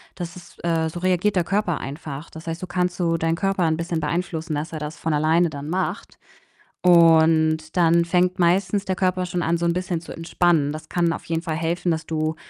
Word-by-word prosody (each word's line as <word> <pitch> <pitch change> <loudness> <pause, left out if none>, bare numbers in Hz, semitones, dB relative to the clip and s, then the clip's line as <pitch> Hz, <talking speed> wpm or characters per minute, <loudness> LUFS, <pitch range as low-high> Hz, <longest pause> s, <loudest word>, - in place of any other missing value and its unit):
Das 175 0 -6
ist 175 -1 -14
äh, 165 -1 +1
so 175 - -7
reagiert 185 +2 +1
der 180 - +3
Körper 180 -2 0
einfach. 145 +1 -7
Das 160 +1 -11
heißt, 165 +1 -3
so 185 - -6
kannst 180 0 -1
du 165 -1 +1
deinen 165 0 0
Körper 195 -1 0
'n 160 -1 +1
bisschen 170 -1 -2
beeinflussen, 160 0 -2
dass 155 +3 -4
er 155 - -4
das 150 +1 -6
von 160 -1 -2
alleine 160 +3 +3
dann 145 0 -7
macht. 185 +3 -3 0.7
Und 160 -2 +4
dann 170 0 +4
fängt 180 +1 +1
meistens 195 +3 +2
der 190 - -1
Körper 185 -1 0
schon 175 0 -2
an, 170 +1 +1
so 170 - -2
'n 170 - +2
bisschen 180 -2 -2
zu 165 - -11
entspannen. 165 -3 +1
Das 155 +1 -8
kann 170 -1 +1
auf - - -7
jeden 165 0 -2
Fall 160 -3 -2
helfen, 170 +2 -1
dass 160 -1 -3
du 155 0 -1
170 Hz, 220 wpm, -23 LUFS, 160-180 Hz, 0.7 s, Und